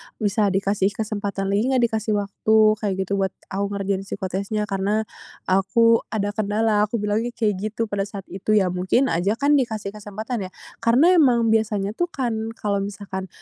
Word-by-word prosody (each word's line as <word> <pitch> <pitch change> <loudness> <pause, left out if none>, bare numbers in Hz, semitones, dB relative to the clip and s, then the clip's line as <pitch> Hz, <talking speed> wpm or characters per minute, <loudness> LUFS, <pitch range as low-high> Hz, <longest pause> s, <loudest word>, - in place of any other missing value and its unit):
"Bisa 210 0 +1
dikasih 195 +1 +1
kesempatan 200 -2 -3
lagi 210 +5 +1
nggak, 255 - +3
dikasih 220 -1 -1
waktu," 205 +2 0 0.2
kayak 205 -3 -1
gitu, 200 +1 -2
"buat 190 -1 0 0.2
aku 200 +1 -1
ngerjain 195 -1 -1
psikotesnya? 195 +2 -3
Karena, 205 +1 0 0.5
aku 230 +5 +4
ada 205 -2 -2
kendala." 210 0 +1
Aku 235 - -4
bilangnya 220 +4 -1
kayak 215 -4 +1
gitu 215 +2 -2
pada 200 0 -2
saat 200 -1 -8
itu. 195 +3 0
Ya, 190 -4 +3
mungkin 185 +9 +1
aja 190 +6 +1
kan 285 +2 +3
dikasih 220 -5 -3
kesempatan, 210 +1 -5
ya. 185 - -18 0.3
Karena 245 +10 +4
emang 245 -10 +4
biasanya 210 -3 +1
tuh 350 - +1
kan 225 -7 -3
kalau 200 -2 -1
misalkan, 195 -1 -5
210 Hz, 170 wpm, -23 LUFS, 195-225 Hz, 0.5 s, aku